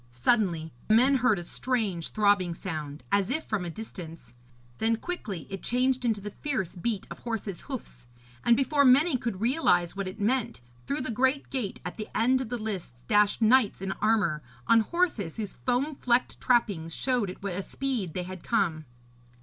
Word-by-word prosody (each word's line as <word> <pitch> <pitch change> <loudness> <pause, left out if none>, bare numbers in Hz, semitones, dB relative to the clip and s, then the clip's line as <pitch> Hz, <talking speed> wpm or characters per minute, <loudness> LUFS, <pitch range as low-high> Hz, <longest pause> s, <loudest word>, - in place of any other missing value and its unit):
Suddenly 165 - +1 0.2
men 255 +5 +5
heard 225 -4 +3
a 175 - -4
strange 205 -5 -1
throbbing 200 -5 +2
sound, 155 -5 -5
as 200 -1 +2
if 310 +5 -1
from 210 -4 -1
a - - -3
distance; 170 - -9 0.5
then 225 +1 +2
quickly 225 - -5
it 195 - -5
changed 255 +1 +1
into 225 -4 +1
the 205 +1 -6
fierce 255 - -2
beat 210 +3 -2
of - - -7
horses' 220 -5 -4
hoofs; 175 - -8 0.4
and 235 -1 +5
before 280 +2 +3
many 280 +4 +5
could 235 -6 -3
realise 220 - +2
what 195 -1 -3
it 185 +4 -7
meant, 235 +2 0 0.3
through 285 - 0
the 255 -1 -2
great 265 +4 +1
gate 250 -8 -3
at 180 - -5
the 215 - -5
end 255 +3 +3
of 250 - -5
the 245 - -2
lists 185 - -5
dashed 210 +2 +3
knights 225 -1 +4
in 195 0 -3
armour, 210 -8 +2 0.2
on 230 - +6
horses 225 - 0
whose 210 -3 -4
foam 260 +5 0
flecked 245 -2 0
trappings 200 -10 +1
showed 250 -6 0
at 185 - -9
what 200 -2 -2
a 190 - -2
speed 230 - -3
they 180 - -1
had 185 0 -8
come. 170 -9 0
215 Hz, 180 wpm, -28 LUFS, 185-250 Hz, 0.5 s, on